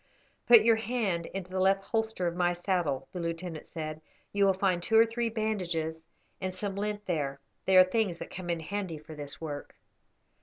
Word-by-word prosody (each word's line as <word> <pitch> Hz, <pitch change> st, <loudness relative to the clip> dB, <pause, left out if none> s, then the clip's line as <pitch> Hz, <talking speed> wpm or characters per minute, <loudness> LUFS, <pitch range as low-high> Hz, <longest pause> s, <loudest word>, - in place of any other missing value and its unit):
"Put 235 Hz, -3 st, +9 dB
your 225 Hz, 0 st, +5 dB
hand 220 Hz, -7 st, -1 dB
into 185 Hz, -1 st, -6 dB
the 185 Hz, -, -1 dB
left 195 Hz, +1 st, +3 dB
holster 220 Hz, -3 st, -1 dB
of 170 Hz, 0 st, -1 dB
my 175 Hz, 0 st, +2 dB
saddle," 175 Hz, -6 st, -1 dB
the 180 Hz, -, -4 dB
lieutenant 170 Hz, -1 st, -4 dB
said. 155 Hz, -2 st, -5 dB, 0.3 s
"You 200 Hz, 0 st, +4 dB
will 195 Hz, -, +5 dB
find 185 Hz, -2 st, +1 dB
two 220 Hz, +5 st, +3 dB
or 225 Hz, -, +8 dB
three 230 Hz, +1 st, -1 dB
bandages 175 Hz, -8 st, -2 dB, 0.4 s
and 185 Hz, -1 st, -3 dB
some 195 Hz, 0 st, -3 dB
lint 205 Hz, 0 st, -3 dB
there; 145 Hz, -6 st, -1 dB, 0.3 s
they 190 Hz, -1 st, +5 dB
are 185 Hz, -, +11 dB
things 185 Hz, -2 st, 0 dB
that -, -, -8 dB
come 180 Hz, -1 st, -6 dB
in 170 Hz, -1 st, -1 dB
handy 190 Hz, -1 st, -3 dB
for 155 Hz, +1 st, -11 dB
this 145 Hz, -2 st, -7 dB
work. 145 Hz, -3 st, -6 dB
185 Hz, 195 wpm, -30 LUFS, 165-205 Hz, 0.4 s, are